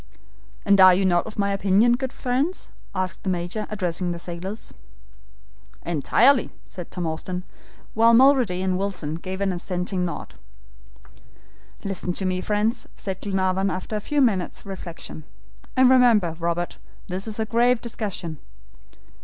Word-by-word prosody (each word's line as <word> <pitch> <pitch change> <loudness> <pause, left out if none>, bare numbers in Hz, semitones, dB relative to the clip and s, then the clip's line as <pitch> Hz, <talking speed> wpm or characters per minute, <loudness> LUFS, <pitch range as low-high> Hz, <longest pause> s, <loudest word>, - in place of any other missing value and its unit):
"And 200 -1 +5
are 185 -1 +9
you 195 +1 +1
not 175 0 +2
of 215 - -9
my 200 -1 +1
opinion, 200 +4 +3
good 260 +1 -2
friends," 270 +9 -2 0.3
added 185 -1 -2
the 190 - -3
Major, 180 +4 -2
addressing 180 -3 -1
the 170 - -4
sailors. 175 +5 -7 1.1
"Entirely," 225 - +3 0.2
said 180 -2 -9
Tom 180 -2 -4
Austin, 180 +3 -3 0.5
while 230 +1 +5
Mulrady 245 -8 +4
and 185 -1 0
Wilson 190 -6 -2
gave 185 +4 -5
an 195 -1 +1
assenting 180 +1 -2
nod. 175 - -5 1.5
"Listen 195 -2 -3
to 190 - -3
me, 185 0 0
friends," 215 +4 0
said 190 -1 -5
Glenarvan 190 -1 0
after 185 +3 -4
a - - 0
few 290 +6 0
minutes' 200 -9 0
reflection; 175 -5 -8 0.5
"and 260 0 +7
remember, 235 -10 +5
Robert, 170 +1 -2 0.3
this 190 +3 -3
is 220 0 -5
a 220 - +1
grave 240 +2 +3
discussion. 195 -9 -5
190 Hz, 145 wpm, -24 LUFS, 180-220 Hz, 1.5 s, are